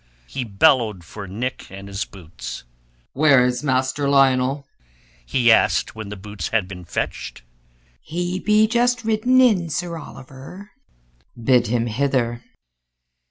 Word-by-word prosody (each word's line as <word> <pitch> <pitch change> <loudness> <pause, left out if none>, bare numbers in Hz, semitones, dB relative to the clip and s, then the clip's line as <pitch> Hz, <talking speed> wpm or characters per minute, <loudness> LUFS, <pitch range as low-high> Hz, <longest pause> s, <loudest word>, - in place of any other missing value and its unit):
He 135 - -5
bellowed 110 - +2
for 100 +3 -9
Nick 120 +8 -5
and 100 +1 -10
his 100 +2 -4
boots. 85 -9 -9 0.5
"Where 140 -3 +5
is 125 0 -1
Master 130 0 0
Lionel? 135 0 +3 0.6
he 120 - +3
asked 110 - +3
when 110 -2 -8
the 105 - -6
boots 105 +1 -6
had 110 -5 0
been 90 -2 -9
fetched. 70 - -4 0.6
"He 175 +3 -3
be 215 +2 +4
just 240 +1 +1
ridden 225 +4 +3
in, 205 -10 +3
Sir 170 +2 -3
Oliver." 140 +8 -12 0.7
"Bid 120 0 +3
him 115 +1 0
hither." 120 -1 -1
130 Hz, 130 wpm, -21 LUFS, 110-160 Hz, 0.7 s, Where